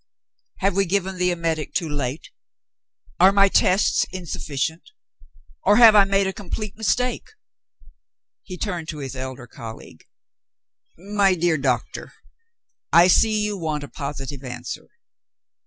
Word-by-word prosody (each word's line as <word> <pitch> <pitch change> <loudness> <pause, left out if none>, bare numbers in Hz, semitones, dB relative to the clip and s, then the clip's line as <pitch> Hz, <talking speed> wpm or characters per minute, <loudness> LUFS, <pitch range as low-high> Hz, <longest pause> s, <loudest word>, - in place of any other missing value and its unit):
Have 195 -1 +1
we 195 0 +2
given 190 0 -2
the 180 0 +2
emetic 165 -3 -2
too 170 - 0
late? 145 -1 -4 0.9
Are 185 +2 +7
my 200 0 +5
tests 190 +1 +3
insufficient? 160 -3 -4 0.7
Or - - +4
have 230 -3 +9
I 200 -1 +7
made 195 0 +1
a 190 - -2
complete 205 +1 -6
mistake?" 240 +3 -1 1.1
He 180 - -9
turned 175 -5 -4
to 155 - -5
his 135 -2 -6
elder 130 -1 -6
colleague. 115 -1 -11 0.9
"My 195 +1 +1
dear 170 -2 +1
doctor, 130 -3 -2 0.8
I 170 +1 +7
see 215 +3 +3
you 210 -1 -2
want 155 -3 -3
a - - -7
positive 140 -2 -6
answer. 125 -1 -7
175 Hz, 130 wpm, -22 LUFS, 145-195 Hz, 1.1 s, have